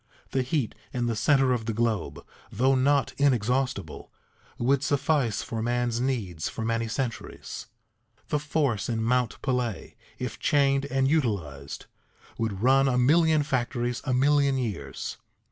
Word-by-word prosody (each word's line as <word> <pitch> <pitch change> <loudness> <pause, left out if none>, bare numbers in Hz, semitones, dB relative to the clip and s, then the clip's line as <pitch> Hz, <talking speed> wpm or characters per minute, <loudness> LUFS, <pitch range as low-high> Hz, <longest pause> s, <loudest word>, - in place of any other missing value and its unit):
The 135 - +1
heat 130 -2 -1 0.2
in 120 -1 -1
the 115 -1 0
center 135 +3 +3
of 115 -3 -2
the 115 - -1
globe, 115 -2 -1 0.3
though 130 +4 +2
not 135 +1 +2
inexhaustible, 130 - 0 0.5
would 130 +3 +2
suffice 140 -5 +1
for 115 -1 -4
man's 120 0 0
needs 105 -12 -2
for 110 - -5
many 115 0 0
centuries. 115 0 -5 0.6
The 150 - +1
force 140 - 0
in 110 -1 -1
Mount 125 0 +1
Pelée, 125 -5 -2 0.2
if - - -5
chained 140 -1 +2
and 135 -1 +1
utilized, 95 - -1 0.5
would 110 -3 -2
run 135 +2 +5
a 125 -2 +2
million 155 +4 +4
factories 120 -2 -1
a 130 - -2
million 140 +1 +3
years. 100 - -4
125 Hz, 140 wpm, -27 LUFS, 115-135 Hz, 0.6 s, run